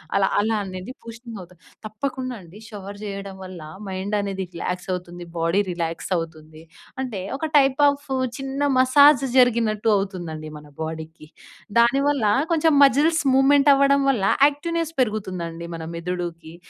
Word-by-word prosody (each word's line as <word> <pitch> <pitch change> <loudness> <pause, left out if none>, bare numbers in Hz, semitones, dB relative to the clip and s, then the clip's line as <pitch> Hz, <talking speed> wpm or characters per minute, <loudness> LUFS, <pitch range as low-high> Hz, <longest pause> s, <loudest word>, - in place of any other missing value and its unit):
అలా 195 -1 +3
అలా 220 +1 0
అనేది 185 +4 -7
బూస్టింగ్ 230 -1 -9
అవుతది. 180 -1 -15 0.3
తప్పకుండా 255 +3 -4
అండి 175 +5 -14
షవర్ 200 -1 -9
చేయడం 200 -1 -6
వల్ల 185 -1 -9 0.3
మైండ్ 190 +2 -3
అనేది 195 -1 -3
రిలాక్స్ 180 +2 -4
అవుతుంది. 175 -1 -7
బాడీ 165 +4 +2
రిలాక్స్ 165 -1 -4
అవుతుంది. 160 -1 -8 0.4
అంటే 235 -7 -5 0.2
ఒక 315 +2 -3
టైప్ 270 0 +3
ఆఫ్ 285 +1 -5 0.3
చిన్న 270 +1 -4 0.2
మసాజ్ 275 +1 +6
జరిగినట్టు 230 -3 +3
అవుతుందండి 175 -6 -5
మన 150 - -16
బాడీకి. 160 0 -7 0.5
దానివల్ల 275 +1 +3 0.3
కొంచెం 320 -1 +3
మజిల్స్ 300 +5 +2
మూవ్‌మెంట్ 280 +2 +5
అవ్వడం 280 0 +3
వల్ల 230 -7 -2 0.2
యాక్టివ్‌నెస్ 330 +2 -3
పెరుగుతుందండి 185 -7 -3
మన 165 - -7
మెదుడుకి. 170 -2 -5
205 Hz, 135 wpm, -23 LUFS, 175-270 Hz, 0.5 s, మసాజ్